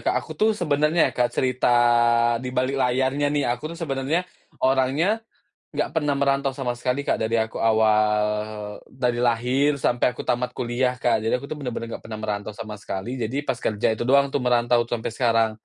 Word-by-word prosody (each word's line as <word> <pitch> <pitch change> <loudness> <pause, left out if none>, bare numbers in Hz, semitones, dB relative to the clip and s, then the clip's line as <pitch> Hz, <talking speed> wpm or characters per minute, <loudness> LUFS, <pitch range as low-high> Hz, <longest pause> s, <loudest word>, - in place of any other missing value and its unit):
Kak. - - +2
Aku - - -8
tuh 215 0 +3
sebenarnya 150 0 +2
ya, - - -16
Kak, 120 -1 +1
cerita 130 -1 +1 0.7
dibalik 130 +1 -1
layarnya 130 +3 +1
nih, 145 -1 0
aku 150 +6 -5
tuh - - -11
sebenarnya 150 +2 -1 0.4
orangnya 135 - +2 0.5
enggak - - -2
pernah 145 -1 0
merantau 140 0 +1
sama 130 -3 -2
sekali, 125 +3 -2
Kak, - - +1
dari 115 +1 +1
aku 110 0 -1
awal 110 -1 +3 0.6
dari 125 -2 -1
lahir 125 +5 +2
sampai 125 -1 +1
aku - - -6
tamat 125 +1 0
kuliah, 125 +1 -1
Kak, 120 -3 +1
jadi 115 +3 +1
aku 140 - -8
bener-bener 125 -5 -5
enggak - - -8
pernah 110 -1 -6
merantau 105 -1 -4
sama 110 -1 -6
sekali, 115 +6 -5
jadi 135 +6 -2
pas 130 -2 -2
kerja 110 +1 +1
itu 110 - -6
doang 140 +1 +3
tuh 140 - 0
merantau 120 -1 +3
sampai 115 -1 -3
sekarang. 115 -2 +2
125 Hz, 180 wpm, -23 LUFS, 115-140 Hz, 0.7 s, tuh